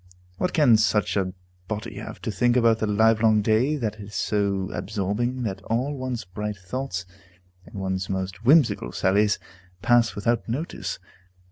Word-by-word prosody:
What 180 - 0
can 140 -9 +5
such 105 -2 +1
a 95 -2 0 0.4
body 105 0 -5
have - - -7
to - - -2
think 120 +5 +2
about 115 -2 +4
the 110 - 0
livelong 110 0 +4
day 115 +8 +2
that 110 -6 -3
is 105 0 -9
so 100 -2 0
absorbing 110 +5 -2
that 100 -4 -3
all 130 +6 -1
one's 130 -5 -4
bright 105 +3 -5
thoughts, 90 0 -4 0.6
and - - -14
one's 95 -1 -3
most 95 +1 -4
whimsical 130 - +4
sallies, 105 +2 +2 0.5
pass 120 -1 +3
without 115 +3 -1
notice? 145 +9 -3
110 Hz, 150 wpm, -25 LUFS, 100-120 Hz, 0.6 s, can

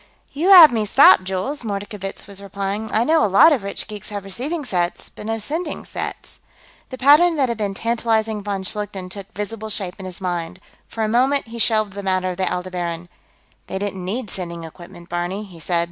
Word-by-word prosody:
"You 325 +7 0
have 350 -7 +11
me 225 -2 0
stopped, 185 - +7
Jules," 190 +10 -3
Mordkovitz 200 -2 -5
was 200 0 -6
replying. 200 +2 -4
"I 220 - +2
know 315 +4 +3
a - - +4
lot 200 - +7
of 265 - 0
rich 200 0 -5
geeks 210 -2 -8
have 205 -2 -6
receiving 280 - -4
sets, 175 -6 -2
but 210 - -10
no 225 0 -1
sending 305 - -4
sets." - - -7 0.5
The 255 - -7
pattern 300 +6 +6
that 270 -4 +1
had 230 -1 -3
been 200 -2 -2
tantalizing 225 -1 0
von 200 -1 -3
Schlichten 195 -2 -4
took 200 0 -8
visible 215 +1 -5
shape 195 -2 -3
in 190 - -7
his 185 +1 -9
mind. 175 -1 -4 0.3
For 225 - -4
a - - +1
moment, 255 +3 +2
he 235 0 -7
shelved 215 -3 +1
the 200 - -6
matter 185 -1 0
of 180 - -7
the 190 - -1
Aldebaran. 175 -1 -4 0.6
"They 190 - -4
didn't 195 -2 -4
need 210 +3 -4
sending 170 -2 -6
equipment, 175 +1 -12
Barney," 175 +4 -3
he 185 -5 -13
said. 170 +1 0
205 Hz, 205 wpm, -21 LUFS, 185-230 Hz, 0.6 s, have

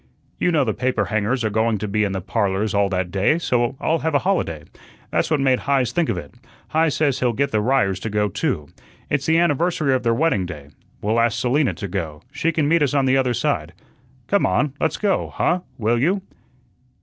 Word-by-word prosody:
You 180 - +2
know 155 -4 +3
the 110 -4 -1
paper 125 -4 0
hangers 110 +5 0
are 110 - 0
going 110 +1 +1
to 105 - -4
be 105 +1 +1
in 100 - 0
the 95 -1 -3
'Parlors' 100 0 -1
all 100 -1 +2
that 90 -2 -2
day, 100 - +2
so 125 -5 0
I'll 165 +1 +1
have 160 -2 -1
a 140 - +1
holiday. 85 - 0 0.5
That's - - +1
what 155 -2 +2
made 130 -2 +2
Heise 135 -3 +1
think 170 -3 0
of - - -1
it. 75 -5 -8 0.4
Heise 160 -1 +2
says 145 -4 +1
he'll 125 -2 +1
get 140 +5 0
the 110 - +1
Ryers 105 -6 +1
to 110 - -4
go 105 0 +1
too. 75 -5 -2 0.4
It's 140 0 0
the 160 0 +4
anniversary 170 -3 +2
of 130 - +1
their 115 -1 +1
wedding 115 - +1
day. 75 -5 -9 0.3
We'll 110 +3 +1
ask 115 -1 +1
Selina 125 - +1
to 100 - -5
go; 85 -5 -5
she 165 +1 0
can 155 -3 0
meet 165 +1 +3
us 145 -1 +1
on 135 -1 +3
the 130 0 +3
other 125 -2 +1
side. - - -1 0.5
Come - - +1
on, 130 +10 +1
let's 160 - 0
go, 205 -2 0
huh, 180 - +1 0.2
will 115 +1 +1
you?" 185 +9 +1
120 Hz, 220 wpm, -21 LUFS, 100-145 Hz, 0.5 s, the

